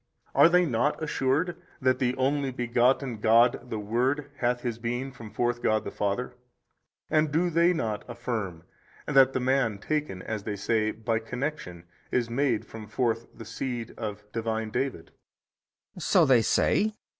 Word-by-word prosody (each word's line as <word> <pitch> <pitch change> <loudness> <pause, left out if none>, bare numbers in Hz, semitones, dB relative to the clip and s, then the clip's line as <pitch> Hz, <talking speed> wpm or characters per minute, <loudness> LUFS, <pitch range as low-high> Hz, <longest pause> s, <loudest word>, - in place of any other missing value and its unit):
A. - - -11
Are - - +9
they 180 +1 +4
not 120 +1 0
assured 155 +4 0 0.2
that 130 0 +2
the 125 -1 +1
Only 135 +1 +1
Begotten 125 0 +1
God 120 +3 +4
the 110 - -3
Word 130 +7 -1
hath 120 0 0
His 120 -2 -3
Being 120 +3 -3
from 120 -4 -10
forth 120 +2 -1
God 110 -1 +2
the - - -5
Father 105 +5 -2 0.7
and 155 -1 +2
do 175 +4 +1
they 170 +2 +4
not 115 -11 -2
affirm 115 -8 -4 0.4
that 135 -2 +5
the - - 0
man 125 -4 +1
taken 125 -4 -3
(as 110 -2 -4
they 105 +1 -4
say) 110 +1 0
by 115 +1 -1
connection 120 - -5 0.3
is 120 -2 0
made 125 -3 +1
from 110 -2 -10
forth 115 0 -1
the 115 - -9
seed 120 +1 -4
of 105 -1 -5
Divine 110 -1 -2
David? 130 +3 -3 0.8
B. - - -11
So - - +4
they 125 -3 +5
say. 215 - +2
120 Hz, 165 wpm, -27 LUFS, 110-135 Hz, 0.8 s, Are